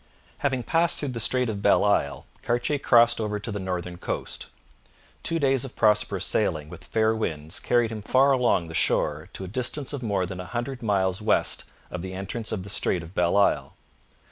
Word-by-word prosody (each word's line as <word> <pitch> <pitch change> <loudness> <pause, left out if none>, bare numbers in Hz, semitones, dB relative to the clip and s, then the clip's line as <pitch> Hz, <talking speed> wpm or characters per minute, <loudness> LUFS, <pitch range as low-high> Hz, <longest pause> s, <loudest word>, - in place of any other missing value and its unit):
Having 130 -3 0
passed 165 +4 +2
through 145 - -2
the 120 -2 -4
Strait 125 +2 +3
of 105 -3 -3
Belle 100 - +4
Isle, 70 -9 +1 0.2
Cartier 120 +5 0
crossed 120 -2 +4
over 105 -1 -2
to 105 +2 -5
the 100 - -3
northern 90 -2 -4
coast. - - -4 0.7
Two 165 - 0
days 135 -4 +2
of 135 - -6
prosperous 105 -4 +2
sailing 80 -6 0
with 85 +1 -11
fair 110 +3 +1
winds 80 -6 -3
carried 120 -2 +1
him 110 -1 -5
far 130 +6 +3
along 125 -9 +2
the 80 - -9
shore 75 +1 +1
to - - -6
a - - -6
distance 130 +7 -1
of 140 - -4
more 100 -5 0
than 90 0 -7
a 90 - -5
hundred 125 +1 -4
miles 95 -3 0
west 105 - +1 0.3
of 90 - -4
the 95 +1 -6
entrance 100 +4 -4
of 100 -4 -3
the 100 - -8
Strait 90 -3 +2
of 80 +3 -12
Belle 90 +1 +2
Isle. 100 - +2
105 Hz, 200 wpm, -25 LUFS, 90-120 Hz, 0.7 s, Belle